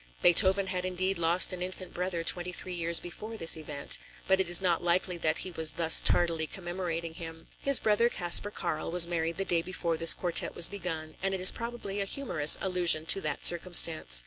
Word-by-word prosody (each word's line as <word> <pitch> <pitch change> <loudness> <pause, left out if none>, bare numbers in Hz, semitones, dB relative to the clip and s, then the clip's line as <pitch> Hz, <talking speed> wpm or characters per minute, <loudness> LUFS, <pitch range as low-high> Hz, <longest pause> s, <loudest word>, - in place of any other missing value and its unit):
] - - -30
Beethoven 190 +2 +4
had 185 -1 -5
indeed 185 0 -3
lost 170 +3 +2
an 180 - -8
infant 185 0 -7
brother 180 -1 -5
twenty 175 +1 0
three 180 +1 -6
years 170 -1 +3
before 215 +6 -9
this 165 -5 +3
event, 150 -3 -4 0.3
but 190 0 +1
it 190 -2 -2
is 175 - +4
not 175 -3 -1
likely 180 +1 -1
that 155 -1 -1
he 185 - -5
was 160 -2 -1
thus 165 -1 +4
tardily 165 -2 +1
commemorating 175 -2 -7
him. 165 -1 -11
His 275 -1 +3
brother 220 +2 0
Kaspar 175 0 +2
Karl 155 -6 -6
was 175 0 +6
married 165 -1 -4
the 195 - -4
day 170 -3 0
before 170 -2 -4
this 165 +1 +5
quartet 175 -2 -1
was 170 - +2
begun 165 -5 -8
and 195 +1 -3
it - - -7
is 185 - +4
probably 230 -4 -7
a - - -2
humorous 175 - +5
allusion 180 -4 +1
to 195 - +1
that 150 -4 -5
circumstance. 165 - +4
175 Hz, 205 wpm, -27 LUFS, 165-190 Hz, 0.3 s, was